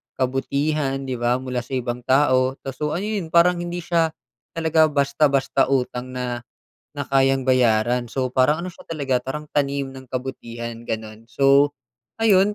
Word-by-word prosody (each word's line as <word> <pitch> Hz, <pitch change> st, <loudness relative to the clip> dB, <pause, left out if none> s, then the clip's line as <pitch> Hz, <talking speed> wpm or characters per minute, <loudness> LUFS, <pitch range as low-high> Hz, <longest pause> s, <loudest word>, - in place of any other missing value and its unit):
kabutihan, 135 Hz, +2 st, 0 dB
'di 130 Hz, -2 st, -4 dB
ba, 120 Hz, +1 st, +2 dB
mula 125 Hz, -1 st, -2 dB
sa 125 Hz, +2 st, -5 dB
ibang 120 Hz, -1 st, -2 dB
tao 130 Hz, -1 st, +3 dB
kaso 150 Hz, +3 st, -3 dB
ayon 200 Hz, -1 st, -2 dB
parang 170 Hz, +2 st, +4 dB
hindi 175 Hz, 0 st, -4 dB
siya 165 Hz, -2 st, +1 dB, 0.4 s
talaga 160 Hz, -1 st, +3 dB
basta-basta 140 Hz, -2 st, +2 dB
utang 125 Hz, -1 st, -1 dB
na, 125 Hz, -1 st, -3 dB, 0.5 s
na 145 Hz, -, -3 dB
kayang 135 Hz, -1 st, +3 dB
bayaran. 120 Hz, -1 st, +3 dB
So, 130 Hz, -1 st, -1 dB
parang 140 Hz, +6 st, +2 dB
ano -, -, -4 dB
siya -, -, -15 dB
talaga 140 Hz, -5 st, 0 dB
parang 150 Hz, +4 st, -5 dB
tanim 140 Hz, -1 st, 0 dB
ng 130 Hz, 0 st, -11 dB
kabutihan 120 Hz, -3 st, -6 dB
ganon, 110 Hz, 0 st, -6 dB
so 140 Hz, +2 st, +4 dB, 0.5 s
ayun 210 Hz, -2 st, +4 dB
135 Hz, 150 wpm, -22 LUFS, 125-150 Hz, 0.5 s, parang